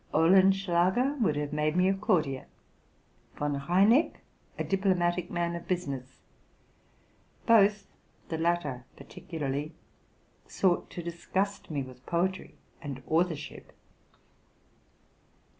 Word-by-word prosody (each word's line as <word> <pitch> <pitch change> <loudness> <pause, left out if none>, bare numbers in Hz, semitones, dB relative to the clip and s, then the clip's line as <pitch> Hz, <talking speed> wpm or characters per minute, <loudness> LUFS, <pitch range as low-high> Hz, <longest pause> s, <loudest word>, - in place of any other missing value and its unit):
Olenschlager 190 - +4
would 170 -9 +2
have 145 0 -3
made 150 +1 0
me 180 +1 +4
a 195 - +3
courtier, 160 -9 0 0.9
Von 145 -1 -2
Reineck 205 - +4 0.4
a - - -1
diplomatic 180 -3 0
man 170 -1 -1
of 170 - -8
business: 140 -8 -4 1.2
both, 210 -3 +4 0.4
the 160 - -2
latter 160 -7 -1
particularly, 145 +1 -5 0.7
sought 180 -3 +1
to 175 - -7
disgust 190 +4 -3
me 145 -4 -2
with 130 0 -13
poetry 185 +2 -1 0.3
and 135 -4 -7
authorship. 160 -2 -2
170 Hz, 100 wpm, -29 LUFS, 150-190 Hz, 1.2 s, Olenschlager